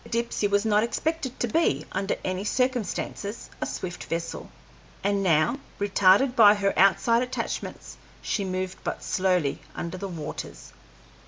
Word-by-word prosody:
The -, -, -14 dB
Dipsey 235 Hz, -2 st, 0 dB
was 200 Hz, +1 st, +1 dB
not 210 Hz, -1 st, +4 dB
expected 275 Hz, +3 st, -2 dB
to 240 Hz, -, +1 dB
be, 325 Hz, +8 st, +1 dB
under 195 Hz, -, -1 dB
any 185 Hz, +1 st, -2 dB
circumstances, 230 Hz, -3 st, -2 dB
a -, -, -1 dB
swift 175 Hz, -1 st, -5 dB
vessel, 165 Hz, 0 st, -4 dB, 0.5 s
and 200 Hz, 0 st, +1 dB
now, 185 Hz, -, +2 dB, 0.2 s
retarded 205 Hz, +5 st, +4 dB
by 210 Hz, -3 st, +8 dB
her 200 Hz, -1 st, +1 dB
outside 200 Hz, +5 st, +4 dB
attachments, 250 Hz, 0 st, -4 dB, 0.2 s
she 205 Hz, -, -2 dB
moved 185 Hz, 0 st, -4 dB
but -, -, -4 dB
slowly 180 Hz, -6 st, +1 dB, 0.2 s
under 170 Hz, +2 st, -5 dB
the 200 Hz, -, -4 dB
waters. 165 Hz, -5 st, -7 dB
200 Hz, 145 wpm, -26 LUFS, 185-235 Hz, 0.5 s, by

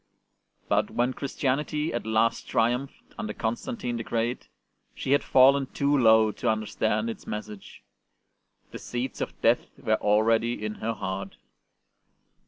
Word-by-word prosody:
But -, -, +1 dB
when 125 Hz, +2 st, 0 dB
Christianity 150 Hz, +3 st, -2 dB
at 120 Hz, -, -3 dB
last 110 Hz, +1 st, +1 dB
triumphed, 120 Hz, +4 st, -1 dB
under 105 Hz, 0 st, -3 dB
Constantine 120 Hz, -, -3 dB
the 115 Hz, -, -4 dB
Great, 115 Hz, +2 st, -2 dB, 0.5 s
she 130 Hz, -, -3 dB
had 145 Hz, -, +4 dB
fallen 135 Hz, +1 st, +5 dB
too 140 Hz, +2 st, +1 dB
low 110 Hz, -4 st, +5 dB
to -, -, -2 dB
understand 110 Hz, 0 st, 0 dB
its 115 Hz, -, -6 dB
message; 105 Hz, -1 st, -7 dB, 0.9 s
the -, -, -7 dB
seeds 125 Hz, +1 st, -4 dB
of -, -, -4 dB
death -, -, +3 dB
were -, -, +1 dB
already 110 Hz, +2 st, +2 dB
in 105 Hz, -, -3 dB
her 115 Hz, +1 st, -1 dB
heart. 95 Hz, -2 st, -5 dB
115 Hz, 135 wpm, -27 LUFS, 110-130 Hz, 0.9 s, fallen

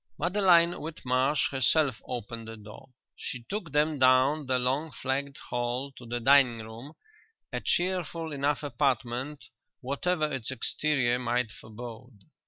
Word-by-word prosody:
Madeline 175 Hz, -1 st, +4 dB
Whitmarsh 135 Hz, -2 st, 0 dB
herself 135 Hz, -1 st, +2 dB
opened 115 Hz, -1 st, -5 dB
the 115 Hz, 0 st, -7 dB
door. 105 Hz, +5 st, -12 dB, 0.3 s
She 125 Hz, -2 st, -5 dB
took 190 Hz, -, -5 dB
them 150 Hz, 0 st, +2 dB
down 130 Hz, +3 st, +4 dB
the 130 Hz, -1 st, +2 dB
long 135 Hz, +5 st, 0 dB
flagged 135 Hz, +3 st, -3 dB
hall 125 Hz, +3 st, -2 dB
to 125 Hz, -3 st, -13 dB
the 120 Hz, +1 st, -2 dB
dining 130 Hz, -1 st, +5 dB
room, 115 Hz, +7 st, -10 dB, 0.6 s
a -, -, 0 dB
cheerful 175 Hz, -3 st, -1 dB
enough 145 Hz, +1 st, 0 dB
apartment 135 Hz, +1 st, -1 dB, 0.4 s
whatever 155 Hz, +5 st, 0 dB
its 130 Hz, -5 st, -3 dB
exterior 130 Hz, 0 st, +1 dB
might 120 Hz, -2 st, 0 dB
forebode. 115 Hz, +2 st, -10 dB
130 Hz, 130 wpm, -29 LUFS, 120-150 Hz, 0.6 s, dining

